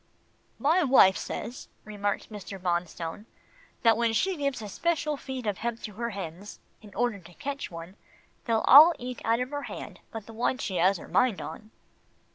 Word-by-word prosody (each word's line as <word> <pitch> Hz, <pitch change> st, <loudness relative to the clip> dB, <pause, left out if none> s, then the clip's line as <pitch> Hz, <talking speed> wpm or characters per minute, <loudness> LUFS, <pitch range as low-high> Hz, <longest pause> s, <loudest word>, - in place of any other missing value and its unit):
"My 325 Hz, +6 st, +3 dB
wife 250 Hz, -9 st, +6 dB
says," 245 Hz, -, -6 dB, 0.2 s
remarked 205 Hz, 0 st, -3 dB
Mr. 200 Hz, -2 st, -8 dB
Bonstone, 175 Hz, +2 st, -3 dB, 0.6 s
"that 225 Hz, -2 st, +6 dB
when 230 Hz, 0 st, +1 dB
she 380 Hz, -, +1 dB
gives 280 Hz, -5 st, -2 dB
a 215 Hz, -, -6 dB
special 305 Hz, -, -1 dB
feed 265 Hz, -3 st, -6 dB
of 205 Hz, -3 st, -2 dB
hemp 235 Hz, 0 st, -3 dB
to 210 Hz, -, -6 dB
her 235 Hz, +3 st, -3 dB
hens, 195 Hz, -1 st, -7 dB, 0.2 s
in 210 Hz, -2 st, -14 dB
order 240 Hz, -2 st, 0 dB
to 175 Hz, -1 st, -16 dB
catch 285 Hz, 0 st, -5 dB
one, 170 Hz, +2 st, -9 dB, 0.5 s
they'll 225 Hz, -3 st, +1 dB
all 315 Hz, +5 st, +10 dB
eat 250 Hz, 0 st, -6 dB
out 230 Hz, +1 st, +2 dB
of 250 Hz, +2 st, -3 dB
her 290 Hz, 0 st, -3 dB
hand -, -, -8 dB
but 225 Hz, -3 st, -7 dB
the 225 Hz, -, -11 dB
one 240 Hz, +3 st, 0 dB
she 195 Hz, -7 st, -3 dB
has 185 Hz, +3 st, +3 dB
her -, -, -11 dB
mind 195 Hz, +3 st, +2 dB
on." 215 Hz, -, -8 dB
225 Hz, 185 wpm, -28 LUFS, 195-255 Hz, 0.6 s, all